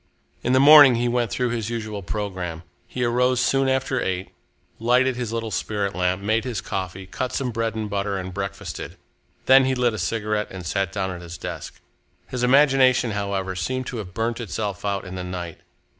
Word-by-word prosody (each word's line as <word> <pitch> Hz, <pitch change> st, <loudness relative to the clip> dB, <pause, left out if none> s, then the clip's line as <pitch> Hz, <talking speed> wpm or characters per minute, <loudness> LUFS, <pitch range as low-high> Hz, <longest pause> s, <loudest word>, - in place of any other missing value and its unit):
In 125 Hz, -, 0 dB
the 130 Hz, -, +5 dB
morning 145 Hz, -2 st, +9 dB
he 120 Hz, +1 st, 0 dB
went 120 Hz, -1 st, 0 dB
through 125 Hz, +3 st, -1 dB
his 115 Hz, -2 st, -2 dB
usual 110 Hz, -3 st, -4 dB
programme. 90 Hz, -4 st, -4 dB, 0.2 s
He 125 Hz, -, -3 dB
arose 125 Hz, +1 st, +2 dB
soon 135 Hz, +1 st, +2 dB
after 130 Hz, -1 st, 0 dB
eight, 95 Hz, 0 st, -3 dB, 0.5 s
lighted 125 Hz, +3 st, +3 dB
his 120 Hz, -3 st, -3 dB
little 115 Hz, -1 st, -3 dB
spirit 100 Hz, -2 st, -2 dB
lamp, 90 Hz, +1 st, 0 dB
made 110 Hz, +2 st, +1 dB
his 125 Hz, -6 st, -3 dB
coffee, 95 Hz, 0 st, -5 dB
cut 125 Hz, +7 st, -4 dB
some 130 Hz, -3 st, -1 dB
bread 115 Hz, -1 st, -2 dB
and 110 Hz, -1 st, -3 dB
butter, 100 Hz, -1 st, -2 dB
and 95 Hz, -1 st, -5 dB
breakfasted. 100 Hz, 0 st, -5 dB, 0.5 s
Then 130 Hz, 0 st, +7 dB
he 130 Hz, 0 st, +1 dB
lit 125 Hz, -2 st, +1 dB
a 110 Hz, -, -4 dB
cigarette 105 Hz, -1 st, -1 dB
and 95 Hz, -2 st, -8 dB
sat 95 Hz, +2 st, -1 dB
down 95 Hz, -1 st, -2 dB
at 90 Hz, -1 st, -7 dB
his 85 Hz, 0 st, -8 dB
desk. 85 Hz, -4 st, -7 dB, 0.5 s
His 125 Hz, -, -3 dB
imagination, 130 Hz, -2 st, +4 dB
however, 100 Hz, -2 st, -2 dB
seemed 130 Hz, +8 st, -2 dB
to 125 Hz, -, -5 dB
have 95 Hz, -4 st, -7 dB
burnt 115 Hz, +1 st, -1 dB
itself 105 Hz, -3 st, -4 dB
out 100 Hz, -1 st, -1 dB
in 90 Hz, -, -8 dB
the 90 Hz, -1 st, -4 dB
night. 90 Hz, -2 st, -6 dB
110 Hz, 195 wpm, -23 LUFS, 95-125 Hz, 0.5 s, morning